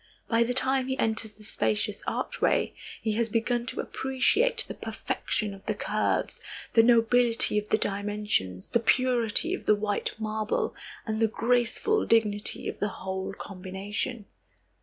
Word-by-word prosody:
By 230 0 +2
the 240 +1 +1
time 265 0 +2
he 265 0 -1
enters 220 -2 +1
the 215 - -17
spacious 110 - 0
archway, - - 0 0.3
he 220 - +1
has 230 +2 0
begun 235 +2 0
to - - -4
appreciate 265 - +1
the - - -5
perfection 210 -2 -3
of 195 - -13
the - - 0
curves, - - -1 0.3
the 225 - +7
nobility 230 -1 +4
of 210 - -9
the - - +4
dimensions, 200 - -1
the 235 - +3
purity 250 - +2
of 385 - -5
the 210 - +6
white 205 0 -2
marble 215 -1 -1 0.3
and 220 -1 -2
the 225 - +4
graceful 245 - +1
dignity 210 -2 +1
of - - -5
the 205 - 0
whole 190 0 -4
combination. 200 +5 -5
220 Hz, 150 wpm, -28 LUFS, 205-245 Hz, 0.3 s, the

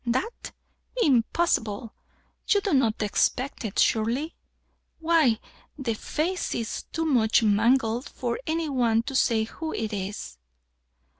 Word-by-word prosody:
"That? 260 - -2 0.5
Impossible! 230 -5 +1 0.5
You 410 - +4
do 395 -4 -1
not 230 -6 +2
expect 250 +6 0
it, 215 -4 -5
surely? 235 +8 +1 0.6
Why, 320 -9 +3 0.4
the 255 -5 -1
face 330 - -2
is 230 -2 -4
too 325 0 -1
much 235 -7 +3
mangled 225 +3 +2
for 240 -2 -3
any 325 0 0
one 235 -5 +2
to 270 - -6
say 230 -4 +3
who 315 +8 -6
it 220 -1 -3
is." 190 - -5
240 Hz, 125 wpm, -26 LUFS, 220-300 Hz, 0.6 s, You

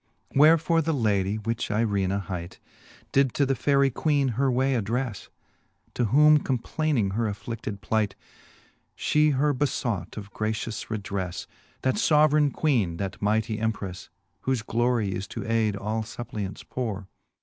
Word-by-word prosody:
IV. - - -4
Wherefore 165 +2 +5
the 160 0 0
lady, 100 -5 +1
which 115 +1 -3
Eirena 100 -3 0
hight. 90 -2 -6 0.5
Did 135 -2 +2
to 140 - +3
the 135 - +1
Faery 140 +1 +2
Queene 140 0 +1
her 130 +3 +1
way 130 +2 +2
addrefle, 115 -3 -2 0.7
To 120 - 0
whom 150 +6 +6
complayning 130 -4 0
her 115 +2 0
affli(9:ed 105 -1 -5
plight, 110 -2 0 0.8
She 150 0 +3
her 145 +1 +2
befought 125 -9 -2
of 100 -1 -8
gratious 110 0 -3
redrefte. 100 -4 -4 0.4
That 130 - +1
fbveraine 150 -6 +4
queene, 115 - +1
that 95 0 -5
mightie 110 +1 0
emperefle, 100 -4 -3 0.4
Whofe 130 -4 0
glorie 120 -4 +1
is 95 +1 -4
to - - -6
aide 110 -2 +1
all 105 +3 -2
fuppliants 105 -2 -6
pore. 105 -6 -4
115 Hz, 140 wpm, -26 LUFS, 100-135 Hz, 0.8 s, whom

